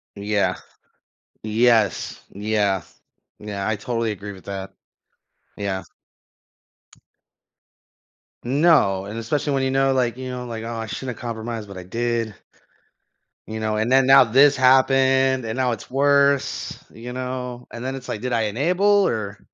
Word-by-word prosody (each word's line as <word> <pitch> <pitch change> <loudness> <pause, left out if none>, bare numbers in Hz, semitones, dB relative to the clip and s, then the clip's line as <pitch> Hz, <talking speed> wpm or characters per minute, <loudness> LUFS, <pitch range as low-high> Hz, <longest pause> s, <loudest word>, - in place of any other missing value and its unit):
Yeah. 100 0 0 0.9
Yes. 110 -1 +1
Yeah. 100 -2 0 0.6
Yeah, 100 -1 -4
I 110 - +1
totally 115 +1 -2
agree 100 0 -7
with 95 - -15
that. 95 -1 -6 0.8
Yeah. 100 -2 -3 2.6
No, 130 - +3
and 110 +3 -6
especially 145 +5 -1
when 135 -1 0
you 130 - 0
know, 135 0 +2
like, 120 -2 +1
you 130 0 -6
know, 125 0 -5
like, 115 -2 -6
"Oh, 115 0 -5
I 115 0 -4
shouldn't 125 +1 -5
have - - -13
compromised, 115 -2 -5
but 100 -1 -10
I 90 - -7
did." 115 +1 -2 1.1
You 110 0 -5
know? 110 -1 -1
And 110 +3 0
then 135 0 +5
now 135 0 +8
this 135 +5 +5
happened, 130 -1 +4
and 110 +1 -3
now 125 -2 +1
it's 115 - -6
worse. 140 +1 +2
You 120 +2 -8
know? 125 -1 -5
And 120 +1 -7
then 135 +1 -3
it's 130 -1 -9
like, 105 - -4
"Did 125 -1 -2
I 115 - +2
enable?" 160 - 0 0.2
Or 100 -2 -3
120 Hz, 150 wpm, -22 LUFS, 105-130 Hz, 2.6 s, now